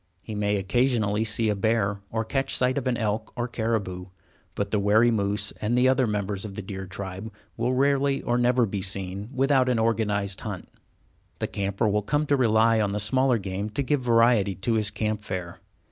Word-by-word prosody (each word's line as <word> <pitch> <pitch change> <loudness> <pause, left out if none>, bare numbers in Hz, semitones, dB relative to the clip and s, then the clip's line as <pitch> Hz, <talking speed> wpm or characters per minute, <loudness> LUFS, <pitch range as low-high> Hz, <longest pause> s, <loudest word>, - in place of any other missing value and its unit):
He 110 - -7
may 105 0 0
occasionally 110 +1 +1
see 110 +1 +1
a 105 - +1
bear, 100 -1 0
or 110 0 -2
catch 135 +4 -1
sight 125 0 +1
of 130 - -5
an 125 -2 +1
elk 110 0 -2
or 120 0 -2
caribou, 110 -6 -2 0.5
but 100 0 -2
the 105 - +2
wary 110 +4 +4
moose 105 -1 0
and 115 +3 0
the 125 +1 +4
other 130 -1 +3
members 100 -2 -2
of 100 -3 -7
the 105 - -5
deer 95 0 -6
tribe 95 +3 -7 0.2
will 120 +2 0
rarely 140 +1 +2
or 120 0 +1
never 120 0 +3
be 100 -2 -4
seen 95 +2 -4
without 135 -1 +2
an 125 - +2
organized 105 -3 0
hunt. 100 -5 -6 0.7
The - - -2
camper 100 +2 -1
will 105 0 +1
come 145 +9 0
to 145 - +2
rely 115 -3 +3
on 100 -1 0
the 105 - -1
smaller 130 +4 +2
game 100 +1 -4
to 125 +7 -2
give 145 0 0
variety 115 -4 +3
to 95 +6 -1
his 110 -2 +1
camp 105 +1 -2
fare. 90 -4 -6
110 Hz, 200 wpm, -25 LUFS, 100-120 Hz, 0.7 s, wary